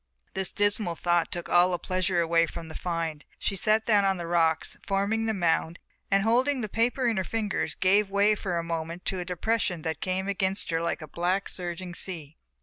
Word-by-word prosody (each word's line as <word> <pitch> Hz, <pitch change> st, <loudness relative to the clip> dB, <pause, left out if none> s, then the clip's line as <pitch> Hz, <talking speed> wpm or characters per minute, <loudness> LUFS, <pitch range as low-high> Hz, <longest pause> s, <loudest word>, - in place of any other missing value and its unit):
This 190 Hz, -1 st, -2 dB
dismal 205 Hz, -3 st, +1 dB
thought 175 Hz, 0 st, +1 dB
took 175 Hz, -2 st, -4 dB
all 175 Hz, +1 st, +5 dB
the 180 Hz, -, 0 dB
pleasure 185 Hz, 0 st, 0 dB
away 165 Hz, 0 st, +3 dB
from 165 Hz, 0 st, -8 dB
the -, -, -8 dB
find, 165 Hz, -3 st, -3 dB
she 195 Hz, -, -2 dB
sat 215 Hz, +3 st, +2 dB
down 210 Hz, -3 st, +4 dB
on 195 Hz, -1 st, +2 dB
the 170 Hz, -, -5 dB
rocks 165 Hz, -2 st, +1 dB
forming 205 Hz, +3 st, +1 dB
the -, -, +2 dB
mound 170 Hz, -2 st, +1 dB, 0.3 s
and 195 Hz, 0 st, +3 dB
holding 255 Hz, +5 st, +2 dB
the 215 Hz, -, -2 dB
paper 240 Hz, +5 st, 0 dB
in 230 Hz, -3 st, +1 dB
her 190 Hz, -, +1 dB
fingers 210 Hz, 0 st, -2 dB
gave 200 Hz, +2 st, +3 dB
way 200 Hz, +2 st, +4 dB
for 190 Hz, -4 st, -2 dB
a 170 Hz, -, -1 dB
moment 165 Hz, +1 st, -4 dB
to 190 Hz, -, -1 dB
a 175 Hz, -, -4 dB
depression 180 Hz, -1 st, -1 dB
that 160 Hz, 0 st, -3 dB
came 190 Hz, +1 st, -1 dB
against 195 Hz, -1 st, 0 dB
her 165 Hz, 0 st, +1 dB
like 170 Hz, -1 st, -2 dB
a -, -, -8 dB
black, 180 Hz, +5 st, -1 dB
surging 175 Hz, 0 st, -5 dB
sea. 160 Hz, -5 st, -5 dB
185 Hz, 210 wpm, -27 LUFS, 170-205 Hz, 0.3 s, all